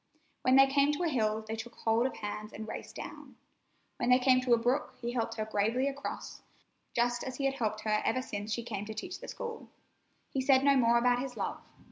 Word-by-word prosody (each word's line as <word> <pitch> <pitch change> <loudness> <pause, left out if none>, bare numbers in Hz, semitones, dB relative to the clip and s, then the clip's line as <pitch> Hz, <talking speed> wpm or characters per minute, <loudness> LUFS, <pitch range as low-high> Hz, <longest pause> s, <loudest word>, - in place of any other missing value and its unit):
When 255 - +4
they 270 0 +9
came 280 +1 +3
to 295 - -2
a 340 - +2
hill 220 -5 0
they 220 - -3
took 230 +1 -8
hold 230 +3 +2
of 265 - -7
hands 210 0 -6
and 220 +1 -7
raced - - -7
down. - - -9 0.6
When 240 - 0
they 250 - +7
came 255 0 +4
to 250 -1 +3
a - - -1
brook 250 +2 0
he 240 0 -3
helped 230 -2 -2
her 215 -1 -2
gravely 220 +5 +1
across, 280 0 -5 0.5
just 240 0 +1
as 260 -1 -5
he 275 - -2
had 270 - +2
helped 215 -5 -2
her 215 -1 +1
ever 255 - +1
since 205 -2 -5
she 235 +3 -1
came 210 -3 -4
to 220 +1 -7
teach 355 - -5
the - - -9
school. 470 -2 -6 0.6
He 270 - 0
said 265 0 +4
no 280 0 +5
more 235 -2 +4
about 245 +1 +3
his 255 -3 -6
love. 195 - -3
240 Hz, 230 wpm, -31 LUFS, 220-265 Hz, 0.6 s, they